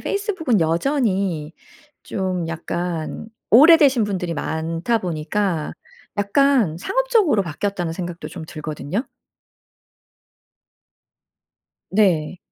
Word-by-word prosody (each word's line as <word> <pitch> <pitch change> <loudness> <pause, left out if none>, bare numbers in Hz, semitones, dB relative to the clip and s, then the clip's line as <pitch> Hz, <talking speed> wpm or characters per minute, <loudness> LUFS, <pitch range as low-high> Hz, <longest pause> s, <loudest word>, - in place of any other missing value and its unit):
페이스북은 375 - 0
여전히 185 - 0 0.5
좀 185 -3 -2
약간 170 +3 -4 0.2
오래되신 275 -2 +7
분들이 180 -4 -3
많다 165 +8 -1
보니까 175 -1 -2 0.4
약간 210 - +2
상업적으로 420 - +2
바뀌었다는 175 +1 -3
생각도 175 -1 -6
좀 170 -4 -8
들거든요. 155 - -4 2.9
네. 180 -5 +2
190 Hz, 210 characters per minute, -21 LUFS, 165-240 Hz, 2.9 s, 오래되신